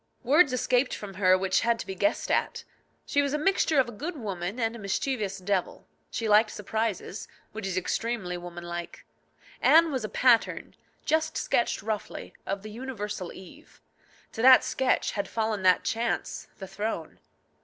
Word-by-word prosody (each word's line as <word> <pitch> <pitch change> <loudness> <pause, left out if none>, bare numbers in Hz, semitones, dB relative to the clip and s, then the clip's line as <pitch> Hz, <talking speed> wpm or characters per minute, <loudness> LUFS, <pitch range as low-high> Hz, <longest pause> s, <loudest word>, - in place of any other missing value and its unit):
Words 290 +3 +5
escaped 255 +1 +1
from 200 -2 -8
her 185 -1 +4
which 190 0 +1
had 235 0 +2
to - - -6
be 190 - -5
guessed 305 +11 0
at. - - 0 0.4
She 285 - +2
was 280 0 -1
a - - +2
mixture 320 -1 +2
of 260 - +3
a - - -7
good 305 - -6
woman 200 -2 -4
and 225 0 0
a - - -8
mischievous 205 0 -2
devil. 190 -1 -2 0.2
She 225 - -3
liked 215 +1 +5
surprises, 215 -1 -3 0.2
which 215 -2 -5
is 185 -1 -2
extremely 190 -1 -2
woman 175 0 -8
like. 175 0 -7 0.6
Anne 320 +5 +6
was 260 -4 -2
a 215 - -3
pattern 240 +2 +2 0.3
just 315 +1 +1
sketched 235 - 0
roughly 215 -1 -5
of 195 0 -3
the 215 - -8
universal 210 -6 -5
Eve. 280 - -14 0.5
To 225 - -5
that 260 +1 +8
sketch 265 -1 0
had 200 -1 -3
fallen 220 -2 -1
that 185 -1 +4
chance, 230 +1 -2
the 190 - -8
throne. 195 -4 -4
220 Hz, 170 wpm, -27 LUFS, 190-255 Hz, 0.6 s, that